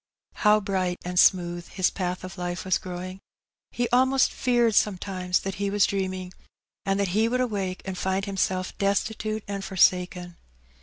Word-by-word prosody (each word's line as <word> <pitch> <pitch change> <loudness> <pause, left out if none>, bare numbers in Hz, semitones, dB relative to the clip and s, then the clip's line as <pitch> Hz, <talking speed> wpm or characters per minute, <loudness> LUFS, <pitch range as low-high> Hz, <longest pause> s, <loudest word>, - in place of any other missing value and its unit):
How 210 0 +5
bright 185 -3 -1
and 180 0 0
smooth 175 -2 +3
his 185 -2 0
path 180 -1 -3
of 185 +1 -7
life 175 0 -4
was 185 - +2
growing! 185 +1 -7 0.5
He 240 0 -1
almost 260 +1 +3
feared 240 -3 +2
sometimes 185 -3 +1
that 195 - -4
he 200 - +1
was> 205 0 +3
dreaming^ 185 -2 -3 0.5
and 195 0 +1
that 200 -2 +1
he 215 +5 +2
would 250 +1 0
awake 200 -7 -2
and 190 -1 -4
find 190 +1 -1
himself 190 -2 -1
destitute 215 +2 -1
and 200 -1 -4
forsaken. 180 -2 +1
190 Hz, 160 wpm, -26 LUFS, 180-205 Hz, 0.5 s, How